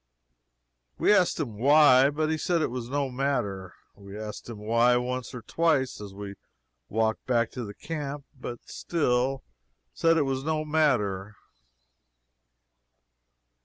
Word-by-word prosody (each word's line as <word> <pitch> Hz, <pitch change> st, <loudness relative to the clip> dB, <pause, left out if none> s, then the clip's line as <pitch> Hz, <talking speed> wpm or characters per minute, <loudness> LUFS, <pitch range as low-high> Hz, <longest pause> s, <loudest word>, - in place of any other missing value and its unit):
We -, -, +4 dB
asked 180 Hz, -5 st, +3 dB
him 115 Hz, -9 st, -4 dB
why, 140 Hz, 0 st, +6 dB
but 155 Hz, +2 st, -1 dB
he 160 Hz, -, 0 dB
said 170 Hz, -1 st, +1 dB
it -, -, -1 dB
was 125 Hz, -1 st, -5 dB
no 140 Hz, -1 st, -1 dB
matter. 105 Hz, -9 st, -2 dB, 0.2 s
We 100 Hz, 0 st, -11 dB
asked 110 Hz, +2 st, -7 dB
him 115 Hz, -, -7 dB
why, 115 Hz, +3 st, +3 dB
once 125 Hz, -1 st, -3 dB
or 125 Hz, -2 st, -8 dB
twice, 145 Hz, -5 st, 0 dB
as 100 Hz, -1 st, -8 dB
we 100 Hz, 0 st, -7 dB, 0.6 s
walked 110 Hz, 0 st, -1 dB
back 120 Hz, -2 st, +1 dB
to 125 Hz, -, -5 dB
the 105 Hz, -2 st, -8 dB
camp 145 Hz, -3 st, -5 dB
but 125 Hz, -2 st, -6 dB
he -, -, -13 dB
still 135 Hz, -4 st, 0 dB, 0.5 s
said 165 Hz, 0 st, +3 dB
it 155 Hz, -, +3 dB
was 135 Hz, -1 st, -2 dB
no 155 Hz, 0 st, -1 dB
matter. 110 Hz, -11 st, +1 dB
130 Hz, 145 wpm, -27 LUFS, 110-150 Hz, 0.6 s, why